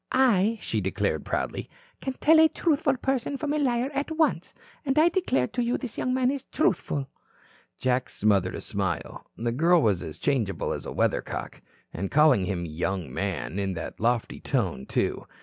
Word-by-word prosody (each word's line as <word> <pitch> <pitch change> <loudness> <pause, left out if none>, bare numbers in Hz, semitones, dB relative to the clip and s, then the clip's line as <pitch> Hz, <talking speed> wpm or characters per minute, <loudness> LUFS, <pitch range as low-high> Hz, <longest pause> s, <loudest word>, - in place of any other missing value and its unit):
I," 230 -4 +3
she - - -1
declared - - -1
proudly, - - -3 0.3
"can 265 - -3
tell 315 +4 +5
a 320 0 +7
truthful 295 -5 +1
person 265 +1 -1
from 295 +1 -2
a 305 - +1
liar 255 -1 +1
at 280 +3 -2
once. 320 -1 0 0.3
And 270 -1 -1
I 320 +3 +6
declare 345 - +1
to 245 - -2
you 235 +1 0
this 240 -5 -6
young 255 - -1
man 255 0 +2
is 275 -2 -4
truthful." 145 - 0 0.7
Jack 130 0 0
smothered 100 -3 +1
a - - -5
smile. 95 -5 -3
The 115 +1 -1
girl 165 +8 +4
was 100 -5 +2
as 75 - -7
changeable 115 -9 0
as - - -6
a - - -5
weathercock. - - -2 0.3
And 95 +3 -3
calling 145 -10 +5
him 90 -2 -2
"young 85 -2 -3
man" 95 -1 -3
in 95 -1 -1
that 85 - -6
lofty 120 +1 0
tone, 65 - -1
too. - - -1
160 Hz, 180 wpm, -26 LUFS, -, 0.7 s, a